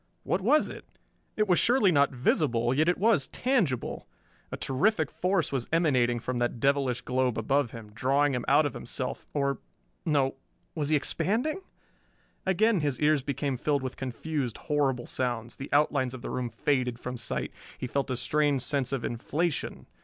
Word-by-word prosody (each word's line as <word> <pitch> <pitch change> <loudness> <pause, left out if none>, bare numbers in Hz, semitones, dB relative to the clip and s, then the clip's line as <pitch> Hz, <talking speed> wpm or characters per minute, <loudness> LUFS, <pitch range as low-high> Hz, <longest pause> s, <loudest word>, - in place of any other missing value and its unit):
What 180 - 0
was 285 +10 +4
it? - - -9 0.5
It 215 0 +2
was 180 -2 +4
surely 235 -6 +4
not 140 -3 +4
visible, 125 -2 +1
yet 155 +5 +3
it 175 - +2
was 205 -9 +3
tangible. 215 - -1 0.4
A - - -4
terrific 155 +4 +1
force 185 -2 0
was 130 -4 -2
emanating 130 -8 +2
from 125 +1 -3
that 120 0 -1
devilish 135 -2 +1
globe 125 -2 0
above 135 +3 +1
him, 110 -2 -10
drawing 135 +4 +2
him 125 -1 -1
out 145 +3 +5
of 145 - -2
himself - - -5
or 140 -2 0 0.4
no 140 -4 +1 0.4
was 150 -3 -1
he 155 - +4
expanding? 235 - 0 0.9
Again 205 +2 +3
his 145 -5 -1
ears 150 -1 +3
became 140 0 -2
filled 140 +1 0
with 130 - -4
confused, 130 0 -3
horrible 140 -5 0
sounds, 120 -2 -2
the 135 - -7
outlines 140 -3 +2
of 125 - -10
the - - -4
room 125 -1 -2
faded 125 +1 0
from 125 0 -5
sight, 120 - -3 0.3
he - - -4
felt 140 +2 -2
a 130 - 0
strange 145 -1 +1
sense 135 0 0
of 135 -4 -2
inflation 150 +7 -2
140 Hz, 170 wpm, -28 LUFS, 125-155 Hz, 0.9 s, out